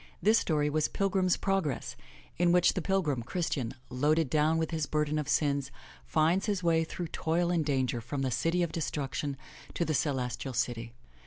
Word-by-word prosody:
This 215 +5 +4
story 150 -3 +1
was 155 +1 +1
Pilgrim's 190 -2 +1
Progress, 190 -9 -1 0.4
in 175 -1 +4
which 180 0 +4
the 185 - -2
pil 190 +3 +1
grim, 140 -6 -1
Christian, 135 -3 -2 0.2
loaded 145 +3 +2
down 155 +1 +3
with 160 0 -1
his 160 -2 -1
burden 150 0 0
of 150 -2 -4
sins, 140 -2 +1 0.4
finds 165 +6 +2
his 200 -3 -1
way 165 -1 +3
through 170 +1 -5
toil 170 +2 0
and 170 -3 +2
danger 130 -4 0
from 135 +4 -3
the 130 - 0
City 165 +8 +1
of 170 - -2
Destruction 145 -3 -3 0.4
to 170 - 0
the 155 - 0
Celes 130 -4 0
tial 130 -3 -6
City. 115 -1 -2
155 Hz, 185 wpm, -30 LUFS, 135-175 Hz, 0.4 s, This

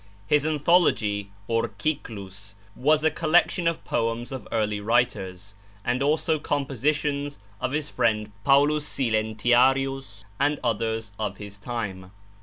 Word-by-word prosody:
His 150 +5 +3
'Anthology,' 145 - +2 0.2
or 115 0 +1
'Cyclus,' 100 -9 -4 0.2
was 150 +3 +3
a 160 - +4
collection 170 +2 +2
of 165 -1 -1
poems 115 +2 -1
of 130 -1 -6
early 105 -2 0
writers, 100 -4 0 0.3
and 125 +2 0
also 155 +2 +2
compositions 145 +1 -1 0.2
of 130 - -2
his 150 0 -1
friend 110 -5 0
Paulus 145 +3 +4
Silentiarius 120 +1 +1
and 145 +1 +2
others 115 -2 -1
of 105 -2 -3
his 100 -1 -9
time. 100 -5 -5
120 Hz, 120 wpm, -25 LUFS, 105-145 Hz, 0.3 s, a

